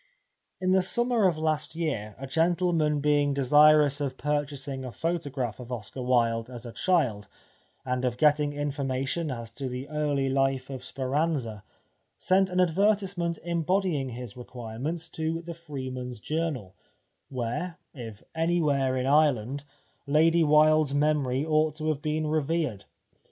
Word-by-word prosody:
In 185 Hz, 0 st, +1 dB
the 190 Hz, 0 st, +5 dB
summer 240 Hz, +2 st, +2 dB
of 170 Hz, -4 st, 0 dB
last 155 Hz, -1 st, -1 dB
year 115 Hz, -11 st, -3 dB
a 135 Hz, -, -6 dB
gentleman 165 Hz, -1 st, +1 dB
being 145 Hz, -1 st, +2 dB
desirous 145 Hz, +1 st, +5 dB
of 135 Hz, -2 st, -2 dB
purchasing 140 Hz, -2 st, -2 dB
a 125 Hz, -, -6 dB
photo 165 Hz, +3 st, -2 dB
graph 125 Hz, -5 st, -3 dB
of 125 Hz, 0 st, -9 dB
Oscar 120 Hz, +2 st, -5 dB
Wilde 120 Hz, -2 st, +1 dB
as 120 Hz, -1 st, -9 dB
a 120 Hz, -, -6 dB
child, 120 Hz, -, +1 dB, 0.6 s
and 125 Hz, 0 st, -1 dB
of 125 Hz, -1 st, 0 dB
getting 150 Hz, 0 st, +3 dB
information 145 Hz, +1 st, -2 dB
as 115 Hz, -3 st, -6 dB
to 130 Hz, +3 st, -5 dB
the 125 Hz, +2 st, -5 dB
early 145 Hz, -3 st, 0 dB
life 135 Hz, 0 st, 0 dB
of 130 Hz, -2 st, -6 dB
Speranza, 135 Hz, -5 st, -2 dB, 0.5 s
sent 190 Hz, +1 st, +3 dB
an 180 Hz, 0 st, -1 dB
advertisement 185 Hz, -1 st, +1 dB
embodying 170 Hz, -4 st, 0 dB
his 120 Hz, -3 st, -7 dB
requirements 125 Hz, +7 st, -5 dB
to 165 Hz, +1 st, -3 dB
The 170 Hz, 0 st, -6 dB
Freeman's 130 Hz, -7 st, -6 dB
Journal, 150 Hz, -, -3 dB, 0.6 s
where, 130 Hz, +8 st, -3 dB, 0.2 s
if 115 Hz, -6 st, -9 dB
anywhere 150 Hz, -6 st, +1 dB
in 130 Hz, -, -1 dB
Ireland, 140 Hz, -2 st, +2 dB, 0.4 s
Lady 165 Hz, +3 st, +4 dB
Wilde's 155 Hz, -1 st, +4 dB
memory 145 Hz, -2 st, +1 dB
ought 155 Hz, -1 st, +2 dB
to 155 Hz, 0 st, -2 dB
have 150 Hz, -2 st, -1 dB
been 155 Hz, 0 st, -1 dB
revered. 155 Hz, -, -1 dB
145 Hz, 140 wpm, -27 LUFS, 130-160 Hz, 0.6 s, the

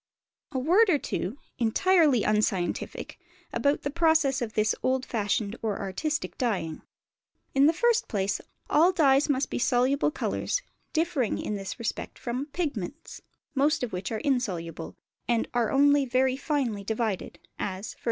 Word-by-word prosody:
A 270 Hz, -, -3 dB
word 360 Hz, -, +4 dB
or 320 Hz, -, +5 dB
two 220 Hz, -3 st, -3 dB, 0.2 s
(entirely 290 Hz, -, +4 dB
unscientific) 210 Hz, -4 st, -1 dB, 0.3 s
about 280 Hz, +5 st, +1 dB
the 285 Hz, -, -2 dB
processes 320 Hz, -4 st, +3 dB
of 225 Hz, -3 st, -3 dB
this 215 Hz, 0 st, +2 dB
old 260 Hz, 0 st, +1 dB
fashioned 210 Hz, -1 st, -1 dB
or 215 Hz, -3 st, -2 dB
artistic 280 Hz, -, -3 dB
dyeing. 180 Hz, -10 st, -1 dB, 0.7 s
In 275 Hz, +1 st, +5 dB
the -, -, +6 dB
first 475 Hz, +6 st, +2 dB
place, 200 Hz, -1 st, -1 dB, 0.3 s
all 335 Hz, +5 st, +5 dB
dyes 290 Hz, -5 st, +4 dB
must 275 Hz, -1 st, 0 dB
be -, -, -1 dB
soluble 255 Hz, +4 st, +2 dB
colours, -, -, -2 dB, 0.3 s
differing 320 Hz, -8 st, 0 dB
in -, -, -3 dB
this 195 Hz, -2 st, -5 dB
respect 230 Hz, -3 st, -4 dB
from 250 Hz, +4 st, -3 dB
pigments; 290 Hz, -, -4 dB, 0.3 s
most 295 Hz, +1 st, +2 dB
of 240 Hz, -, -3 dB
which 180 Hz, +4 st, -4 dB
are 220 Hz, -, -1 dB
insoluble, 180 Hz, -, -2 dB, 0.3 s
and 235 Hz, -1 st, +1 dB
are 240 Hz, -2 st, +1 dB
only 285 Hz, 0 st, +4 dB
very 255 Hz, +1 st, +2 dB
finely 265 Hz, -8 st, -1 dB
divided, 220 Hz, -2 st, -2 dB, 0.2 s
as, 190 Hz, +2 st, -4 dB
_e. -, -, -27 dB
255 Hz, 150 wpm, -27 LUFS, 215-295 Hz, 0.7 s, the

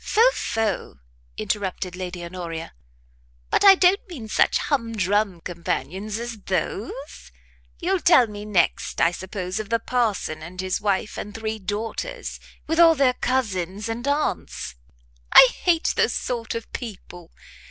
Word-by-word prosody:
"Pho, 470 Hz, +4 st, +4 dB
pho," 220 Hz, -4 st, -2 dB, 0.4 s
interrupted 190 Hz, -3 st, -2 dB
Lady 180 Hz, -1 st, -5 dB
Honoria, 170 Hz, -, -6 dB, 0.8 s
"but -, -, +3 dB
I 390 Hz, -1 st, +10 dB
don't 370 Hz, +2 st, +4 dB
mean 260 Hz, -11 st, -7 dB
such -, -, +3 dB
hum 230 Hz, -6 st, -1 dB
drum 200 Hz, -2 st, +1 dB
companions 180 Hz, +4 st, -3 dB
as 235 Hz, -1 st, -6 dB
those; 230 Hz, -, -4 dB, 0.5 s
you'll 370 Hz, +2 st, +1 dB
tell 330 Hz, -8 st, +6 dB
me 205 Hz, -2 st, -8 dB
next, 200 Hz, -5 st, 0 dB
I 170 Hz, -, +4 dB
suppose, 185 Hz, +1 st, -5 dB
of 215 Hz, -2 st, -5 dB
the 230 Hz, -, +3 dB
parson 220 Hz, -10 st, -1 dB
and 175 Hz, +3 st, -10 dB
his 185 Hz, 0 st, -1 dB
wife 205 Hz, +1 st, -1 dB
and 205 Hz, 0 st, -7 dB
three 220 Hz, -1 st, -3 dB
daughters, 220 Hz, -, -4 dB, 0.3 s
with 325 Hz, +2 st, -1 dB
all 330 Hz, -1 st, +8 dB
their 265 Hz, -3 st, +3 dB
cousins 210 Hz, -6 st, -1 dB
and 235 Hz, +4 st, -4 dB
aunts; 285 Hz, -, -1 dB, 0.6 s
I 260 Hz, -, +11 dB, 0.2 s
hate 345 Hz, -2 st, +3 dB
those -, -, +2 dB
sort 235 Hz, -3 st, -3 dB
of 230 Hz, -, -6 dB
people. 185 Hz, -7 st, -8 dB
215 Hz, 140 wpm, -24 LUFS, 185-255 Hz, 0.8 s, I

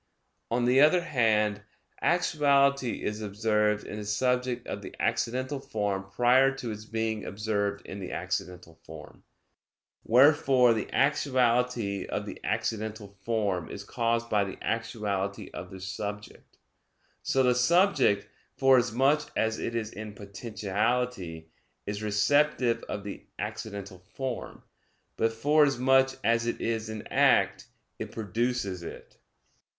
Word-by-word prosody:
On 120 Hz, +1 st, +1 dB
the 125 Hz, +2 st, +5 dB
other 155 Hz, +4 st, +5 dB
hand, 110 Hz, -, +1 dB, 0.4 s
actuality 140 Hz, -6 st, +2 dB
is 105 Hz, +1 st, -3 dB
observed 105 Hz, 0 st, 0 dB
in 105 Hz, -, -6 dB
the 105 Hz, -, -6 dB
subject 125 Hz, +3 st, 0 dB
of -, -, -5 dB
the -, -, -9 dB
accidental 130 Hz, +4 st, -1 dB
form 100 Hz, -5 st, -3 dB
prior 125 Hz, +5 st, +4 dB
to 125 Hz, -4 st, -5 dB
its 105 Hz, 0 st, -8 dB
being 110 Hz, -1 st, -2 dB
observed 100 Hz, 0 st, -2 dB
in 100 Hz, -, -7 dB
the 90 Hz, -, -6 dB
accidental 90 Hz, -1 st, -5 dB
form; 80 Hz, -1 st, -12 dB, 0.8 s
wherefore 130 Hz, -1 st, +5 dB
the 110 Hz, -2 st, -4 dB
actuality 125 Hz, -7 st, +1 dB
of -, -, -3 dB
the -, -, -8 dB
accidental 110 Hz, -2 st, -3 dB
form 100 Hz, -6 st, -1 dB
is 100 Hz, -, -7 dB
caused 115 Hz, +2 st, -1 dB
by 105 Hz, -3 st, +2 dB
the 95 Hz, -1 st, -6 dB
actuality 105 Hz, -4 st, -3 dB
of -, -, -7 dB
the 95 Hz, -, -10 dB
subject. 100 Hz, +2 st, -7 dB, 0.6 s
So 135 Hz, -, +1 dB
the 125 Hz, -1 st, +4 dB
subject, 135 Hz, -, +3 dB, 0.3 s
forasmuch 135 Hz, +3 st, +3 dB
as 110 Hz, 0 st, 0 dB
it 115 Hz, -, -3 dB
is 110 Hz, -1 st, -2 dB
in 110 Hz, 0 st, -8 dB
potentiality, 100 Hz, -3 st, -3 dB, 0.3 s
is 105 Hz, +1 st, -4 dB
receptive 115 Hz, +3 st, +2 dB
of 100 Hz, -, -4 dB
the 100 Hz, -, -8 dB
accidental 100 Hz, -2 st, -6 dB
form: 125 Hz, +7 st, -6 dB, 0.5 s
but 115 Hz, -, +1 dB
forasmuch 135 Hz, 0 st, +3 dB
as 115 Hz, 0 st, +2 dB
it 120 Hz, -, -2 dB
is 110 Hz, -1 st, -2 dB
in 110 Hz, -1 st, -6 dB
act, -, -, +3 dB, 0.3 s
it -, -, -5 dB
produces 110 Hz, -3 st, -2 dB
it. 85 Hz, -, -10 dB
110 Hz, 125 wpm, -28 LUFS, 100-125 Hz, 0.8 s, the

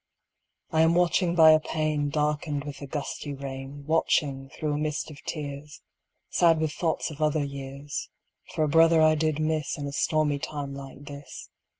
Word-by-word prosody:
I 160 Hz, -, +3 dB
am 165 Hz, +1 st, +4 dB
watching 175 Hz, 0 st, +2 dB
by 160 Hz, -2 st, +8 dB
a 155 Hz, -, +6 dB
pane 155 Hz, -2 st, -1 dB
Darkened 150 Hz, -1 st, -1 dB
with 145 Hz, -1 st, -7 dB
the 140 Hz, -, -7 dB
gusty 145 Hz, 0 st, -4 dB
rain, 135 Hz, +1 st, -7 dB
Watching, 140 Hz, -3 st, +1 dB
through 150 Hz, +1 st, -3 dB
a -, -, -1 dB
mist 150 Hz, 0 st, -2 dB
of 140 Hz, -, -12 dB
tears, 145 Hz, -1 st, -6 dB, 0.4 s
Sad 165 Hz, -2 st, +3 dB
with 155 Hz, -1 st, 0 dB
thoughts 160 Hz, -1 st, -1 dB
of 155 Hz, 0 st, -9 dB
other 150 Hz, -1 st, +2 dB
years, 140 Hz, +1 st, -6 dB, 0.5 s
For 155 Hz, -, +2 dB
a -, -, +2 dB
brother 165 Hz, +2 st, +5 dB
I 155 Hz, 0 st, +6 dB
did 155 Hz, -1 st, 0 dB
miss 155 Hz, +1 st, -1 dB
In 145 Hz, -, -4 dB
a 140 Hz, -, -4 dB
stormy 150 Hz, 0 st, +1 dB
time 140 Hz, -1 st, -5 dB
like 135 Hz, +1 st, -9 dB
this. 145 Hz, -1 st, -10 dB
150 Hz, 180 wpm, -27 LUFS, 140-155 Hz, 0.5 s, by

